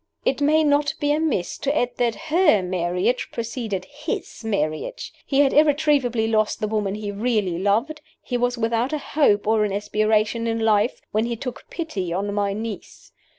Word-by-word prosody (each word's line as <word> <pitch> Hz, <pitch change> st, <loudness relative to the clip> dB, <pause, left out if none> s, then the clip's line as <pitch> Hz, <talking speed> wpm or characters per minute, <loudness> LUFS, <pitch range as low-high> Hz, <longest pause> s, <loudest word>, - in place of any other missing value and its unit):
It 270 Hz, -, +1 dB
may 310 Hz, +2 st, +4 dB
not 290 Hz, 0 st, +2 dB
be 290 Hz, 0 st, +1 dB
amiss 300 Hz, -, 0 dB
to 280 Hz, +2 st, 0 dB
add 245 Hz, -3 st, +1 dB
that 235 Hz, -2 st, +1 dB, 0.2 s
her 325 Hz, -, +5 dB
marriage 180 Hz, +6 st, -1 dB
preceded 225 Hz, -5 st, -4 dB
his 290 Hz, -4 st, -6 dB
marriage. 200 Hz, -, -2 dB
He 275 Hz, 0 st, +3 dB
had 275 Hz, -2 st, +3 dB
irretrievably 285 Hz, -6 st, +3 dB
lost 215 Hz, -1 st, +1 dB
the 215 Hz, -, -1 dB
woman 205 Hz, -2 st, -1 dB
he 210 Hz, -1 st, -4 dB
really 205 Hz, -5 st, 0 dB
loved 225 Hz, +11 st, 0 dB, 0.2 s
he 250 Hz, -, -5 dB
was 245 Hz, 0 st, 0 dB
without 230 Hz, +4 st, 0 dB
a -, -, +1 dB, 0.2 s
hope 210 Hz, -9 st, +3 dB
or 220 Hz, 0 st, +3 dB
an 210 Hz, -, -1 dB
aspiration 215 Hz, +2 st, +1 dB
in 225 Hz, 0 st, -1 dB
life 220 Hz, +1 st, +2 dB
when 220 Hz, +2 st, +1 dB
he 235 Hz, -, -2 dB
took 250 Hz, +2 st, -7 dB
pity 205 Hz, -, -4 dB
on 200 Hz, +3 st, -2 dB
my 200 Hz, -1 st, 0 dB
niece. 215 Hz, +1 st, -7 dB
225 Hz, 175 wpm, -23 LUFS, 205-275 Hz, 0.2 s, her